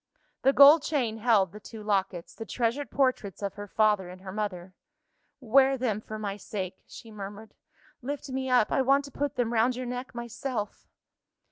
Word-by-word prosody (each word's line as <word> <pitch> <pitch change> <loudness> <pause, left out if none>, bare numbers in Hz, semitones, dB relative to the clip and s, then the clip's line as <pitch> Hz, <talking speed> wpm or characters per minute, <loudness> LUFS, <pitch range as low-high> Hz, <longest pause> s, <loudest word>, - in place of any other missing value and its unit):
The 270 - +5
gold 285 +3 +8
chain 250 -8 -1
held 210 -6 +3
the 210 - -10
two 215 0 -10
lockets 190 -4 -1
the 225 - -7
treasured 240 +5 -2
portraits 255 -8 0
of 200 - -2
her 205 0 -8
father 210 -3 +2
and 185 +1 -11
her 190 -1 -8
mother. 185 -3 -4 0.7
"Wear 265 +2 +4
them 225 -5 -1
for 215 0 -7
my 205 -2 -4
sake," 190 -2 -6
she 225 - -12
murmured. 205 +1 -9 0.5
"Lift 285 +3 -5
me 265 0 -3
up; 250 -4 +3
I - - +2
want 275 +2 +3
to 280 - -11
put 285 0 -3
them 240 -2 0
round 235 +2 +2
your 255 +1 -4
neck 250 +1 -6
myself." 235 -2 -5
225 Hz, 180 wpm, -28 LUFS, 205-260 Hz, 0.7 s, gold